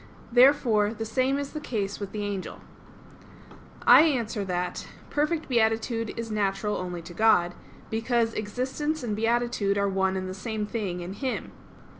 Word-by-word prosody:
Therefore 235 Hz, -4 st, +4 dB
the 225 Hz, +1 st, -4 dB
same 260 Hz, +4 st, +1 dB
is 280 Hz, -1 st, -4 dB
the 305 Hz, -, -3 dB
case 205 Hz, -8 st, -3 dB
with 200 Hz, -2 st, -5 dB
the 210 Hz, -1 st, -4 dB
angel. 200 Hz, -2 st, -4 dB, 1.3 s
I -, -, +9 dB
answer 240 Hz, -9 st, +1 dB
that, 180 Hz, -1 st, -3 dB, 0.2 s
Perfect 305 Hz, +2 st, 0 dB
beatitude 225 Hz, -1 st, 0 dB
is 230 Hz, -1 st, -4 dB
natural 210 Hz, 0 st, 0 dB
only 180 Hz, -2 st, -5 dB
to 175 Hz, -, -10 dB
God, 175 Hz, -4 st, +3 dB, 0.4 s
because 230 Hz, 0 st, +1 dB
existence 260 Hz, +8 st, -2 dB
and 215 Hz, -3 st, -2 dB
beatitude 225 Hz, -2 st, +1 dB
are 200 Hz, 0 st, +2 dB
one 190 Hz, -1 st, +1 dB
and 185 Hz, 0 st, -3 dB
the 185 Hz, -, -5 dB
same 210 Hz, +2 st, -3 dB
thing 205 Hz, -5 st, -3 dB
in 175 Hz, +2 st, -6 dB
Him. 260 Hz, +4 st, -3 dB
220 Hz, 155 wpm, -27 LUFS, 200-245 Hz, 1.3 s, I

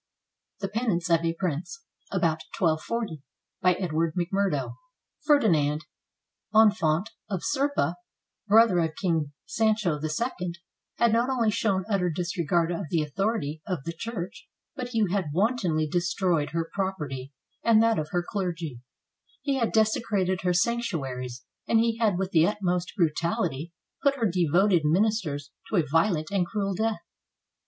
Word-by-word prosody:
THE 195 Hz, -, -1 dB
PENANCE 200 Hz, -6 st, -1 dB
OF 165 Hz, 0 st, +4 dB
A 165 Hz, 0 st, +1 dB
PRINCE 180 Hz, -, -4 dB, 0.3 s
[About 160 Hz, -2 st, +1 dB, 0.2 s
1240] 170 Hz, -, -1 dB, 0.4 s
BY 180 Hz, -1 st, +5 dB
EDWARD 165 Hz, -3 st, -1 dB
McMURDO 180 Hz, -4 st, 0 dB, 0.5 s
[Ferdinand, 160 Hz, -, +3 dB, 0.7 s
Infante 205 Hz, -3 st, +4 dB, 0.2 s
of 190 Hz, -4 st, -3 dB
Serpa, 275 Hz, -, 0 dB, 0.5 s
brother 215 Hz, -3 st, +6 dB
of 160 Hz, -2 st, 0 dB
King 165 Hz, -6 st, 0 dB
Sancho 215 Hz, -8 st, +1 dB
II, 175 Hz, +2 st, -2 dB, 0.4 s
had 235 Hz, -2 st, +3 dB
not 235 Hz, +3 st, +2 dB
only 235 Hz, -5 st, +2 dB
shown 195 Hz, -3 st, 0 dB
utter 195 Hz, -4 st, +1 dB
disregard 170 Hz, 0 st, 0 dB
of 175 Hz, 0 st, -3 dB
the 165 Hz, -3 st, +1 dB
authority 155 Hz, -2 st, -2 dB
of 180 Hz, -8 st, -2 dB
the 165 Hz, -, -4 dB
Church, 185 Hz, -1 st, -6 dB, 0.3 s
but 250 Hz, -, -4 dB
he 225 Hz, -3 st, +1 dB
had 190 Hz, -6 st, 0 dB
wantonly 185 Hz, -5 st, +1 dB
destroyed 175 Hz, -2 st, 0 dB
her 165 Hz, +1 st, -2 dB
property 150 Hz, -9 st, -3 dB, 0.3 s
and 225 Hz, -1 st, +5 dB
that 230 Hz, -4 st, +3 dB
of 150 Hz, 0 st, -3 dB
her 175 Hz, -1 st, -1 dB
clergy, 170 Hz, -, -3 dB, 0.6 s
he 275 Hz, -2 st, 0 dB
had 230 Hz, -, +1 dB
desecrated 210 Hz, -4 st, +1 dB
her 180 Hz, -, +1 dB
sanctuaries, 140 Hz, -, -1 dB, 0.2 s
and 230 Hz, -, +3 dB
he 230 Hz, 0 st, +1 dB
had 210 Hz, -6 st, +2 dB
with 190 Hz, 0 st, -2 dB
the 160 Hz, 0 st, +5 dB
utmost 180 Hz, -4 st, -1 dB
brutality 165 Hz, -2 st, 0 dB, 0.3 s
put 280 Hz, -1 st, +3 dB
her 235 Hz, -4 st, 0 dB
devoted 180 Hz, 0 st, +3 dB
ministers 155 Hz, -4 st, +1 dB, 0.2 s
to -, -, -1 dB
a 170 Hz, -5 st, +3 dB
violent 165 Hz, +1 st, +1 dB
and 190 Hz, -3 st, +1 dB
cruel 200 Hz, -2 st, -1 dB
death. 220 Hz, +3 st, -1 dB
180 Hz, 140 wpm, -27 LUFS, 160-215 Hz, 0.7 s, brother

